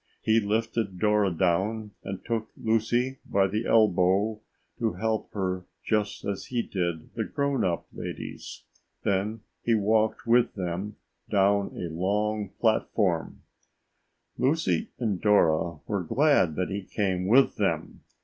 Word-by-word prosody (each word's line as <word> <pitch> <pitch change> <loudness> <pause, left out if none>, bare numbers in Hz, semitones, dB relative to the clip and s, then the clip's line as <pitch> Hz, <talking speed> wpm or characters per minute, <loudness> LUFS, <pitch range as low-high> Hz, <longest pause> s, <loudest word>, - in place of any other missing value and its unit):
He 110 +1 +4
lifted 110 -2 -1
Dora 105 0 +3
down 95 +5 0
and 95 -1 -6
took 115 -2 -2
Lucy 120 +4 0
by 100 -1 +2
the 105 +4 -2
elbow 105 0 +3 0.4
to 115 -3 0
help 110 -1 -2
her 95 -2 -2 0.2
just 105 -2 -1
as 100 -1 -3
he 120 -2 -1
did 85 -4 -3
the - - -2
grown 140 -2 -1
up 85 -2 -1
ladies. - - -7 0.4
Then 100 +3 0 0.2
he 115 - +3
walked 110 +2 +1
with 120 +1 +3
them 95 +2 -3 0.3
down 100 0 +2
a 85 -2 -5
long 105 +3 0
platform. 100 -6 0 1.0
Lucy 130 - +1
and 105 -7 -1
Dora 85 -5 +3
were 100 -2 -1
glad 95 - +3
that 90 +3 -2
he 100 +1 -2
came 95 -2 -1
with 130 +6 +4
them. - - -1
105 Hz, 130 wpm, -27 LUFS, 95-110 Hz, 1.0 s, He